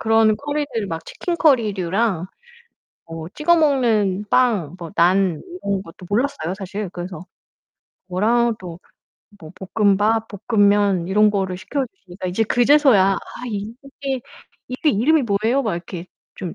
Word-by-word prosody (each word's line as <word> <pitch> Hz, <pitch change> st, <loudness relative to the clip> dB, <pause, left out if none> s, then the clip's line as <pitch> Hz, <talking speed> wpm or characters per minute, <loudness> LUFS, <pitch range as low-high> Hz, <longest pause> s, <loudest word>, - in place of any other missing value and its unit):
그런 225 Hz, -1 st, +3 dB
커리들 285 Hz, -6 st, -3 dB
막 165 Hz, -3 st, -5 dB
치킨 350 Hz, -, -4 dB
커리류랑 210 Hz, -, +1 dB, 0.8 s
뭐 165 Hz, 0 st, -7 dB
찍어 340 Hz, +3 st, +3 dB
먹는 225 Hz, -, +2 dB
빵 210 Hz, -, +2 dB
뭐 170 Hz, -2 st, -7 dB
난 180 Hz, -1 st, +3 dB, 0.2 s
이런 200 Hz, -1 st, -1 dB
것도 180 Hz, +2 st, -13 dB
몰랐어요 205 Hz, -, -1 dB
사실. 200 Hz, 0 st, -5 dB
그래서 180 Hz, +1 st, -7 dB, 0.9 s
뭐라도 205 Hz, -2 st, 0 dB, 0.6 s
뭐 155 Hz, -, -10 dB, 0.3 s
볶음밥, 215 Hz, +2 st, +3 dB, 0.2 s
볶음면 205 Hz, -5 st, +3 dB
이런 210 Hz, +3 st, +4 dB
거를 190 Hz, -3 st, -2 dB
시켜 260 Hz, +8 st, -3 dB
주시니까 185 Hz, -, -9 dB
이제 185 Hz, +5 st, 0 dB
그제서야 245 Hz, -4 st, +4 dB
"아 -, -, -3 dB, 0.3 s
이게 250 Hz, +5 st, -5 dB, 0.5 s
이게 260 Hz, +4 st, +1 dB
이름이 285 Hz, +8 st, +3 dB
뭐예요?" 225 Hz, +5 st, +1 dB
막 215 Hz, -8 st, -1 dB
이렇게 170 Hz, 0 st, -7 dB, 0.3 s
좀 180 Hz, -3 st, -6 dB
210 Hz, 270 characters per minute, -21 LUFS, 185-245 Hz, 0.9 s, 이런